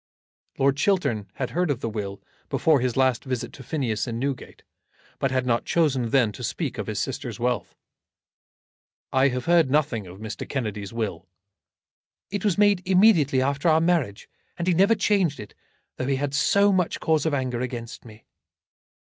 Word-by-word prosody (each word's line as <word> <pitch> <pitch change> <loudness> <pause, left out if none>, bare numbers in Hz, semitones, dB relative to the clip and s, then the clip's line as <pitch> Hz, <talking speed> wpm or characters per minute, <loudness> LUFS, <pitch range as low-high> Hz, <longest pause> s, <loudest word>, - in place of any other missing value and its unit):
Lord 135 0 +2
Chiltern 140 - +1
had 130 - -3
heard 180 0 0
of 140 -5 0
the - - -2
will 100 -3 -5 0.3
before 155 -3 +3
his 125 0 -1
last 130 -3 +2
visit 130 -3 -4
to - - -11
Phineas 125 -5 -2
in 115 -1 -3
Newgate, 135 +1 -4 0.6
but 135 - +1
had 130 -1 0
not 120 -2 +1
chosen 135 -8 +1
then 120 -4 +3
to - - -9
speak - - -3
of - - -4
his - - -3
sister's - - -4
wealth. 120 -1 -2 1.4
"I 130 +1 +4
have 125 -2 -2
heard 170 -5 +4
nothing 130 -8 0
of 90 +1 -11
Mr. 110 +1 -7
Kennedy's 105 -7 -3
will." 105 -6 -4 1.0
"It 205 -1 -3
was 205 -5 +1
made 205 -3 +4
immediately 180 -9 +4
after 140 +4 +1
our 160 0 +5
marriage, 160 - 0 0.3
and 170 - -3
he 180 - +4
never 195 +6 +4
changed 200 -7 +1
it, 105 - -9 0.4
though 130 - -3
he 135 - +1
had 140 +1 -2
so 200 +7 +3
much 180 -3 0
cause 160 -1 +1
of 150 - +1
anger 125 -3 -2
against 120 -2 -6
me." 110 -1 -15
135 Hz, 175 wpm, -25 LUFS, 115-165 Hz, 1.4 s, our